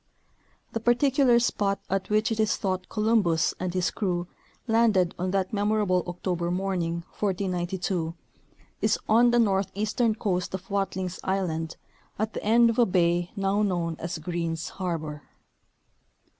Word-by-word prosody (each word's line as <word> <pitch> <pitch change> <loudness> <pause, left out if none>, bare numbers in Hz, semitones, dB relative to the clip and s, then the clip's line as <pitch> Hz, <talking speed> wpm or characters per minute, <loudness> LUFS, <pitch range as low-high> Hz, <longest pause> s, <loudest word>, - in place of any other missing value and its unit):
The 230 - -2
particular 245 +2 +4
spot 205 -4 +1
at 195 0 -2
which 215 +1 +2
it 225 - -2
is 215 -1 +2
thought 185 -2 -2
Columbus 215 -7 +2
and 185 -1 -2
his 180 0 0
crew 180 -4 -1 0.4
landed 225 -6 +3
on 185 +1 -1
that 190 +1 -1
memorable 205 -3 +1
October 175 -1 -2
morning, 175 -2 -1 0.2
1492, 180 -3 -1 0.7
is - - +2
on 235 +3 +5
the 240 - +3
northeastern 210 +2 +1
coast 185 -3 -1
of 190 +1 -9
Watlings 190 -2 -2
island 170 -4 -1 0.4
at 215 +1 -2
the - - -5
end 230 +2 +5
of 230 - -3
a 240 - +5
bay 175 -1 +2
now 195 +1 +1
known 175 -5 0
as 170 +1 -4
Greens 165 0 -3
harbor. 160 -6 -4
190 Hz, 140 wpm, -26 LUFS, 175-215 Hz, 0.7 s, on